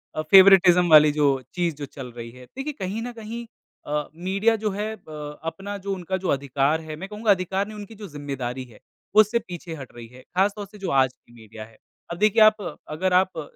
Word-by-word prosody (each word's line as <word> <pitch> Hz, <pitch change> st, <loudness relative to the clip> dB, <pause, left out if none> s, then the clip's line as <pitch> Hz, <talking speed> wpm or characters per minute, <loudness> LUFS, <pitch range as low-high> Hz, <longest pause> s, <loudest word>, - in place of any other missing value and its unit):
अ, 155 Hz, -, -1 dB
favouritism 180 Hz, 0 st, +7 dB
वाली 150 Hz, -1 st, +8 dB
जो 150 Hz, -1 st, +2 dB, 0.3 s
चीज़ 175 Hz, -3 st, -1 dB
जो 145 Hz, 0 st, -6 dB
चल 130 Hz, -2 st, -9 dB
रही 115 Hz, 0 st, -7 dB
है। 125 Hz, +1 st, -14 dB
देखिए 270 Hz, -, -6 dB
कहीं 195 Hz, +4 st, -3 dB
न 245 Hz, -, -5 dB
कहीं 230 Hz, +2 st, -7 dB, 0.4 s
अ, 150 Hz, 0 st, -2 dB
मीडिया 195 Hz, +6 st, +1 dB
जो 215 Hz, -1 st, -2 dB
है 210 Hz, +2 st, -3 dB
अ, 150 Hz, -6 st, -9 dB
अपना 195 Hz, +5 st, -5 dB
जो 200 Hz, 0 st, -4 dB
उनका 190 Hz, 0 st, -3 dB
जो 185 Hz, 0 st, -5 dB
अधिकार 140 Hz, +3 st, 0 dB
है, 155 Hz, -1 st, -7 dB
मैं 190 Hz, +5 st, -8 dB
कहूँगा 210 Hz, 0 st, +1 dB
अधिकार 190 Hz, +1 st, 0 dB
नहीं 215 Hz, 0 st, -9 dB
उनकी 210 Hz, +2 st, -9 dB
जो 210 Hz, -1 st, -9 dB
ज़िम्मेदारी 135 Hz, -5 st, -5 dB
है 120 Hz, -4 st, -17 dB, 0.3 s
उससे 215 Hz, +2 st, +5 dB
पीछे 175 Hz, -4 st, -8 dB
हट 135 Hz, -4 st, -10 dB
रही 120 Hz, -1 st, -10 dB
है, 125 Hz, +2 st, -15 dB
ख़ासतौर 200 Hz, +2 st, +1 dB
से 205 Hz, +2 st, -15 dB
जो 190 Hz, -2 st, -4 dB
आज 130 Hz, -2 st, +3 dB
की 120 Hz, -, -25 dB
मीडिया 110 Hz, -1 st, -11 dB
है। 110 Hz, 0 st, -21 dB, 0.3 s
अब 170 Hz, -, -4 dB
देखिए 215 Hz, +3 st, +3 dB
आप 210 Hz, -7 st, +2 dB
अगर 180 Hz, +5 st, -1 dB
आप 185 Hz, -1 st, +2 dB
अ, -, -, -2 dB
180 Hz, 220 wpm, -24 LUFS, 145-200 Hz, 0.4 s, वाली